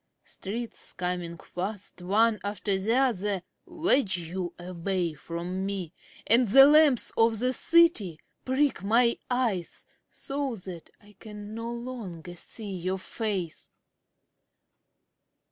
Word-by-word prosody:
Streets 225 Hz, +4 st, -5 dB
coming 180 Hz, -1 st, -3 dB
fast, 190 Hz, +3 st, -5 dB
One 215 Hz, +4 st, +3 dB
after 205 Hz, 0 st, -1 dB
the 205 Hz, +5 st, +1 dB
other, 210 Hz, -8 st, +1 dB, 0.2 s
Wedge 300 Hz, -, +2 dB
you 175 Hz, +1 st, -4 dB
away 180 Hz, -1 st, -2 dB
from 170 Hz, +5 st, -5 dB
me, 195 Hz, -4 st, -3 dB, 0.3 s
And 235 Hz, +2 st, +5 dB
the 270 Hz, +7 st, +9 dB
lamps 295 Hz, -3 st, +5 dB
of 225 Hz, 0 st, +3 dB
the 250 Hz, +3 st, +1 dB
city 295 Hz, -, +3 dB, 0.2 s
prick 260 Hz, -5 st, +1 dB
my 235 Hz, +3 st, +3 dB
eyes 235 Hz, -9 st, -1 dB, 0.2 s
So 275 Hz, -3 st, -3 dB
that 180 Hz, -4 st, -9 dB
I 205 Hz, -1 st, -20 dB
can 210 Hz, -1 st, -9 dB
no 230 Hz, +1 st, -4 dB
longer 230 Hz, -9 st, -7 dB
see 205 Hz, +4 st, -4 dB
your 185 Hz, +1 st, -2 dB
face. 190 Hz, -4 st, -3 dB
205 Hz, 115 wpm, -28 LUFS, 180-240 Hz, 0.3 s, the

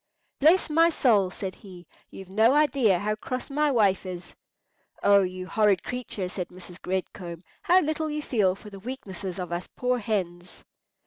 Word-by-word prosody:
"Bless 325 Hz, +6 st, +5 dB
my 330 Hz, +2 st, +4 dB
soul," 220 Hz, -, +3 dB
said 190 Hz, 0 st, -5 dB
he, 180 Hz, -3 st, -13 dB, 0.2 s
"you've 190 Hz, -, -10 dB
no 220 Hz, +6 st, +4 dB
idea 275 Hz, -10 st, +3 dB
how 210 Hz, +4 st, -1 dB
cross 255 Hz, +5 st, -5 dB
my 300 Hz, +1 st, +2 dB
wife 205 Hz, -8 st, +2 dB
is." 180 Hz, -2 st, -8 dB, 0.7 s
"O 200 Hz, 0 st, +6 dB
you 185 Hz, 0 st, -4 dB
horrid 205 Hz, -2 st, +2 dB
creature!" 245 Hz, -6 st, -3 dB
said 180 Hz, -1 st, -5 dB
Mrs. 180 Hz, 0 st, -12 dB
Red 190 Hz, 0 st, -2 dB
Comb. 170 Hz, -2 st, -8 dB, 0.2 s
"How 365 Hz, +2 st, +4 dB
little 310 Hz, 0 st, -2 dB
you 300 Hz, 0 st, -3 dB
feel 200 Hz, -9 st, +1 dB
for 210 Hz, +1 st, -13 dB
the 195 Hz, -, -10 dB
weaknesses 195 Hz, -6 st, -6 dB
of 180 Hz, -2 st, -5 dB
us 175 Hz, +1 st, -3 dB
poor 250 Hz, 0 st, 0 dB
hens!" 180 Hz, -5 st, -4 dB
200 Hz, 175 wpm, -26 LUFS, 185-255 Hz, 0.7 s, O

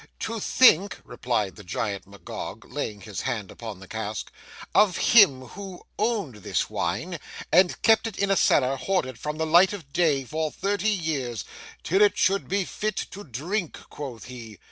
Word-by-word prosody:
'To 225 Hz, 0 st, -3 dB
think,' 200 Hz, -4 st, +5 dB
replied 120 Hz, -5 st, -2 dB
the 105 Hz, -, -11 dB
Giant 100 Hz, -1 st, -3 dB
Magog, 100 Hz, -3 st, -8 dB
laying 105 Hz, -1 st, -5 dB
his 105 Hz, -6 st, -5 dB
hand 105 Hz, -5 st, -3 dB
upon 110 Hz, -5 st, -8 dB
the 95 Hz, -, -12 dB
cask, 110 Hz, -1 st, -5 dB, 0.4 s
'of 200 Hz, -3 st, +4 dB
him 195 Hz, -, +6 dB
who 195 Hz, -2 st, -9 dB, 0.2 s
owned 210 Hz, -, -1 dB
this 105 Hz, -, -2 dB
wine, 115 Hz, -, -2 dB, 0.3 s
and 180 Hz, +1 st, +4 dB
kept 225 Hz, 0 st, +5 dB
it 220 Hz, -, -7 dB
in 200 Hz, 0 st, +1 dB
a -, -, +4 dB
cellar 135 Hz, -6 st, +3 dB
hoarded 130 Hz, -, -1 dB
from 150 Hz, 0 st, -4 dB
the 160 Hz, -, 0 dB
light 175 Hz, +5 st, +5 dB
of 160 Hz, -9 st, -9 dB
day, 155 Hz, -6 st, +2 dB
for 155 Hz, +4 st, -2 dB
thirty 200 Hz, +4 st, -1 dB
years,—"till 160 Hz, -, -2 dB
it 205 Hz, -, +5 dB
should 195 Hz, +1 st, +2 dB
be 195 Hz, 0 st, 0 dB
fit 215 Hz, +2 st, -3 dB, 0.2 s
to 205 Hz, -, -8 dB
drink," 170 Hz, -, -3 dB
quoth 130 Hz, -6 st, -7 dB
he. 115 Hz, -4 st, -10 dB
155 Hz, 165 wpm, -26 LUFS, -, 0.4 s, him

